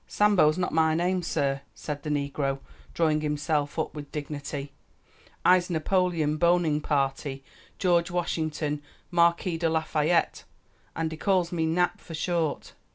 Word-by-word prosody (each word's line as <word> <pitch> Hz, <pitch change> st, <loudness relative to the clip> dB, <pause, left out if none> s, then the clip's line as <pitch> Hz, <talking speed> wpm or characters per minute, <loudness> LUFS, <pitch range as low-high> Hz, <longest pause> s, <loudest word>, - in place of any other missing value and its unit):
"Sambo's 190 Hz, -7 st, +4 dB
not 180 Hz, -, -1 dB
my 160 Hz, 0 st, +3 dB
name, 180 Hz, +2 st, +1 dB
sah," 140 Hz, -5 st, 0 dB, 0.2 s
said 145 Hz, -2 st, -5 dB
the 150 Hz, -, -5 dB
negro, 140 Hz, -1 st, -1 dB, 0.4 s
drawing 155 Hz, -2 st, +2 dB
himself 150 Hz, 0 st, -1 dB
up 160 Hz, -, -1 dB
with 145 Hz, -1 st, -8 dB
dignity; 145 Hz, -1 st, -5 dB, 0.7 s
"I'se 180 Hz, 0 st, +5 dB
Napoleon 165 Hz, -2 st, +1 dB
Boningparty 150 Hz, -5 st, +1 dB, 0.3 s
George 175 Hz, -2 st, +2 dB
Washington 155 Hz, -4 st, -2 dB, 0.3 s
Marquis 170 Hz, 0 st, +2 dB
de 165 Hz, -1 st, +1 dB
Lafayette, 160 Hz, +1 st, +1 dB, 0.5 s
an' 165 Hz, 0 st, -1 dB
dey 160 Hz, -, -7 dB
calls 185 Hz, -2 st, +1 dB
me 165 Hz, -2 st, 0 dB
Nap 175 Hz, +2 st, +1 dB
for 165 Hz, -, -8 dB
short. 165 Hz, -1 st, -1 dB
160 Hz, 130 wpm, -27 LUFS, 150-175 Hz, 0.7 s, I'se